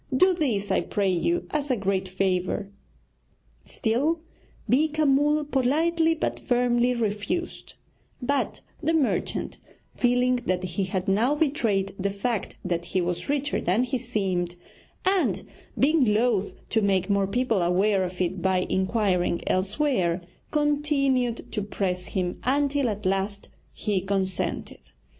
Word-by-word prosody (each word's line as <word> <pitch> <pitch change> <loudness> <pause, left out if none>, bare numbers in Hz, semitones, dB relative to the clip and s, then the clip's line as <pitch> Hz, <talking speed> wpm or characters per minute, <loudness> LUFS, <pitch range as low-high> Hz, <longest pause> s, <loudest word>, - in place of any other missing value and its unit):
Do 370 +5 +5
this, 235 - -1
I - - +3
pray 200 -2 0
you, 340 - 0
as 290 -1 -1
a 255 - +3
great 195 -2 -1
favour.' 190 +1 -1 0.9
Still 285 +8 0 0.5
Beeka 310 +3 +2
Mull 295 +2 +3
politely 320 +5 +2
but 315 - -2
firmly 245 0 +2
refused; 230 - -3 0.4
but 280 +3 -1 0.2
the 325 +1 +1
merchant, 290 -5 -1 0.4
feeling 250 +1 +2
that 185 0 0
he 185 +2 -2
had 185 +1 -3
now 225 +9 +3
betrayed 230 -11 +1
the 200 +1 0
fact 200 +2 -2
that 170 -1 -1
he 180 +2 -1
was 175 +2 -2
richer 290 0 0
than 190 +8 +2
he 255 0 -1
seemed, 190 -7 -2 0.5
and 380 -1 +2 0.3
being 300 +2 +4
loth 215 -2 +2 0.2
to 225 - +2
make 190 -2 +2
more 200 -1 +2
people 230 -2 +1
aware 190 +3 +2
of 180 0 -5
it 180 0 -1
by 190 0 +2
inquiring 190 -3 +1
elsewhere, 190 - +1 0.3
continued 285 -5 +1
to 210 - -2
press 185 -3 -2
him, 180 -2 -2
until 280 0 +1
at 210 -1 -5
last 195 +2 -1 0.2
he 205 -3 -1
consented. 190 -1 -2
215 Hz, 135 wpm, -26 LUFS, 190-275 Hz, 0.9 s, Do